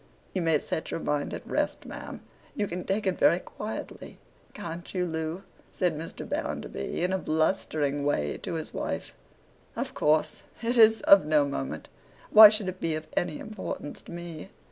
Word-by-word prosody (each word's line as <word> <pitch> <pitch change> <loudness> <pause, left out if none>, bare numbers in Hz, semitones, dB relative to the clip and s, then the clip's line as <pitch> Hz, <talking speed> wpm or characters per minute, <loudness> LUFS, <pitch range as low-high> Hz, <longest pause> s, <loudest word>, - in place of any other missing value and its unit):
'You 185 - 0
may 165 -2 +3
set 160 - -4
your - - -3
mind 150 -2 -1
at - - -6
rest, - - -1
ma'am.—You 210 - -7
can 180 0 -5
take 205 +2 -1
it 190 -1 0
very 170 - +5
quietly, 210 +4 -7 0.3
can't 170 +1 -7
you, 180 -1 +1
Loo?' 160 +2 -3 0.3
said 180 -4 0
Mr. 160 +2 -6
Bounderby, 65 - -3
in 180 +1 +1
a 190 - +1
blustering 155 -3 0
way 75 - 0
to - - -4
his - - -5
wife. - - -4 0.6
'Of - - -3
course. 150 +1 +1 0.2
It 235 +2 +1
is 225 -1 +6
of 195 -1 +7
no 150 -2 +4
moment. 70 - -4 0.4
Why 215 0 +12
should 210 -2 -1
it 185 0 -4
be 165 -1 0
of 155 0 -6
any 155 -3 0
importance 210 -8 -6
to - - -13
me? 170 0 -7
170 Hz, 170 wpm, -28 LUFS, 155-190 Hz, 0.6 s, Why